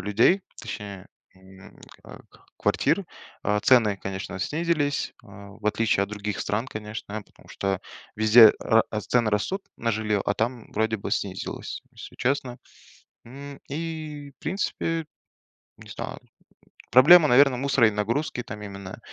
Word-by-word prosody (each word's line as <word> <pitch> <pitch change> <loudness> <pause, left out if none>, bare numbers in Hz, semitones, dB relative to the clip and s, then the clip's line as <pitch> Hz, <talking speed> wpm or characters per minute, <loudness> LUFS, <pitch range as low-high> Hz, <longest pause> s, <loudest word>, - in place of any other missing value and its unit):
людей, 115 - +3 0.2
точнее, 100 -2 -7 0.3
м, 95 0 -16 0.3
ка - - -12 0.4
квартир, - - +1 0.4
а, 105 0 +1
цены, 110 -5 +4
конечно, 95 0 -6
снизились, 150 - -1
а, 100 0 -13
в 105 +1 -9
отличие 105 -2 +2
от 100 - -3
других 105 -3 -4
стран, 110 +7 -1
конечно, 105 -2 -6
потому - - -23
что 95 -1 -2 0.4
везде 110 +1 +8
ра 115 0 +4 0.2
цены 115 +1 +1
растут 185 - -1
на 115 - -1
жилье, 105 -2 0
а 105 - 0
там, 115 +2 -3
вроде 110 +1 0
бы, 100 - -6
снизилось, 95 -2 -4
если - - -11
честно, 130 -1 -1 0.7
м. 140 +3 -10
И, 155 -1 -5
в - - -73
принципе, 165 -2 -2 0.7
не - - -14
знаю, - - -6
м, - - -29 0.6
проблема, 150 +6 +8
наверно, 135 0 +5
мусора 135 -3 +3
и - - -6
нагрузки 115 +6 -1
там 105 -2 -8
именно. 100 -2 -8
110 Hz, 140 wpm, -25 LUFS, 105-140 Hz, 0.7 s, везде